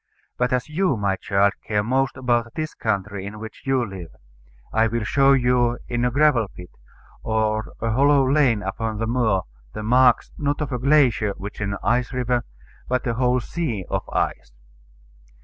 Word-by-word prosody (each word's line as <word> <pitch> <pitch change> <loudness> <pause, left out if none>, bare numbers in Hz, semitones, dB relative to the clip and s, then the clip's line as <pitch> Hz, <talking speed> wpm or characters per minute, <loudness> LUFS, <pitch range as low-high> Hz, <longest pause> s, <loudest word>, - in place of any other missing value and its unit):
But 125 0 0
as 125 -1 0
you, 155 -3 0
my 100 -2 0
child, 100 +1 +1
care 105 -1 +1
most 130 +2 0
about 120 -2 0
this 155 -1 -3
country 100 -2 -2
in 105 +2 -7
which 110 0 -9
you 130 -2 +2
live, 95 -4 -8 0.6
I 110 +1 +3
will 115 0 -2
show 135 +6 +4
you 125 -2 +2
in 120 0 -1
any 125 - +3
gravel 135 -5 +3
pit, 90 -2 -13 0.5
or 110 0 -1
hollow 135 +4 +3
lane 130 -7 +3
upon 110 +3 -3
the 115 - -1
moor, 110 -5 +1 0.3
the 105 - -5
marks, 125 +2 +4
not 145 -1 -1
of 150 -2 -3
a 125 - -2
glacier, 125 -7 +3
which 100 +2 -8
is - - 0
an 100 - -3
ice 125 +1 +1
river, 125 -1 0 0.4
but 125 +1 -1
of 115 -2 -1
a - - -6
whole 125 0 +3
sea 120 - -3
of - - -2
ice. - - -2
120 Hz, 180 wpm, -23 LUFS, 105-130 Hz, 0.6 s, show